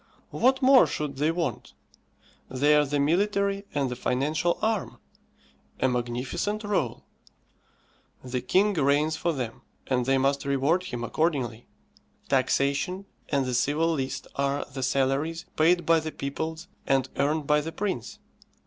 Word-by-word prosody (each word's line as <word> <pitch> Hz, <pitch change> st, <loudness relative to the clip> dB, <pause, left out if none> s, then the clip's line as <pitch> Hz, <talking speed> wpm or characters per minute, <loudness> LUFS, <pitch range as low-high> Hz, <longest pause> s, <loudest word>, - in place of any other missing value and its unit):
What 265 Hz, +2 st, +2 dB
more 260 Hz, -1 st, +7 dB
should 145 Hz, -3 st, -4 dB
they 150 Hz, +3 st, +2 dB
want? 165 Hz, -8 st, -3 dB, 0.8 s
They 145 Hz, +4 st, +3 dB
are 150 Hz, -1 st, +3 dB
the 145 Hz, +1 st, 0 dB
military 200 Hz, +6 st, +1 dB
and 140 Hz, -3 st, -1 dB
the -, -, -3 dB
financial 150 Hz, +8 st, 0 dB
arm. 220 Hz, -3 st, -1 dB, 0.8 s
A 130 Hz, -, +3 dB
magnificent 125 Hz, -, -2 dB
rôle. 205 Hz, -2 st, -1 dB, 1.2 s
The 125 Hz, 0 st, -3 dB
king 195 Hz, +11 st, +2 dB
reigns 150 Hz, 0 st, +2 dB
for 170 Hz, +1 st, 0 dB
them, 125 Hz, -7 st, -5 dB, 0.2 s
and 125 Hz, -2 st, 0 dB
they 135 Hz, 0 st, +3 dB
must 140 Hz, +1 st, +1 dB
reward 140 Hz, +6 st, +1 dB
him 120 Hz, -8 st, -5 dB
accordingly. 125 Hz, -5 st, -1 dB, 0.6 s
Taxation 140 Hz, +8 st, +1 dB, 0.2 s
and 140 Hz, -2 st, +1 dB
the 130 Hz, -, -2 dB
civil 145 Hz, +7 st, +1 dB
list 135 Hz, -3 st, -3 dB
are 140 Hz, +1 st, 0 dB
the 135 Hz, -, -4 dB
salaries 140 Hz, +6 st, 0 dB
paid 175 Hz, +3 st, +3 dB
by 165 Hz, -1 st, +4 dB
the 155 Hz, 0 st, -5 dB
peoples 160 Hz, +5 st, -5 dB, 0.2 s
and 135 Hz, -2 st, +2 dB
earned 150 Hz, +2 st, +1 dB
by 150 Hz, +1 st, +3 dB
the 160 Hz, +2 st, -5 dB
prince. 190 Hz, -, -4 dB
145 Hz, 140 wpm, -26 LUFS, 135-170 Hz, 1.2 s, more